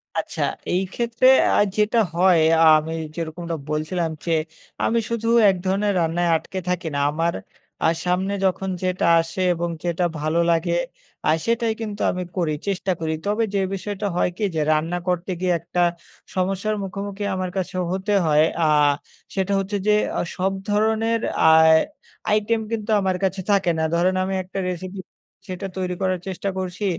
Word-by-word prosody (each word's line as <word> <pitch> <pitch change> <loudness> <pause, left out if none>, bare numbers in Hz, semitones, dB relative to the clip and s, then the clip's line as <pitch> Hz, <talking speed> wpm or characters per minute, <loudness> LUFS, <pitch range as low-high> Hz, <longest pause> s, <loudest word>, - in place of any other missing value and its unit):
আচ্ছা। - - -3 0.3
এইক্ষেত্রে 230 +7 +1 0.3
আর 205 - +5
যেটা 210 +2 +3 0.2
হয় 180 -1 +5 0.2
আ - - +7
আমি 160 +1 -5 0.2
যেরকমটা 170 0 -4
বলছিলাম 155 +3 -1 0.2
যে, 170 - -1 0.5
আমি 230 - +2
শুধু 230 -1 -2 0.2
এক 190 - +2
ধরনের 200 +2 +1
রান্নায় 170 +1 +1
আটকে 185 +4 -4
থাকি 180 -1 -1
না - - 0
আমার 165 +3 0 0.5
আ - - +5 0.2
সামনে 185 +2 0
যখন 190 +1 0
যেটা 185 0 0 0.2
আসে 165 +3 -5
এবং 175 0 -2
যেটা 175 0 0
ভালো 155 +3 0
লাগে 170 +1 +1 0.5
আ - - +4 0.2
সেটাই 230 -1 +1
কিন্তু 210 -2 -5
আমি 180 - -3
করি 165 -4 +1
চেষ্টা 195 -1 -1
করি। 160 -1 -1
তবে 210 +3 +1
যে, 200 - +1
বিষয়টা 205 +1 -3
হয় 180 - +2
কি - - -3
যে, 155 - +1
রান্না 160 +3 0
করতে 180 +1 -1
গিয়ে 180 -1 +1
একটা 170 +2 -2 0.5
সমস্যার 195 +3 0
মুখোমুখি 200 +1 -5
আমার 185 -1 -2
কাছে 185 -1 -3 0.2
হতে 190 +2 -1
হয়। 150 -1 +4 0.2
আ - - +4 0.7
সেটা 195 0 0
হচ্ছে 195 +1 -2
যে, 210 - +5 0.3
অ - - +1
সব 190 +1 0 0.2
ধরনের 220 +2 +1 0.3
আ - - +9 0.9
item 225 +2 0
কিন্তু 220 -1 -3
আমার 190 -1 0
কাছে 190 0 0
থাকে 195 -3 +3
না। - - +1
ধরেন 180 +2 +2
আমি 190 +1 -2
একটা 185 +2 -6
recipe 185 +2 -6 0.5
সেটা 185 +1 -5
তৈরি 180 -1 -2
করার 185 -1 0
চেষ্টা 190 +1 -3
করছি। 185 +2 -3
185 Hz, 165 wpm, -22 LUFS, 175-200 Hz, 0.9 s, আ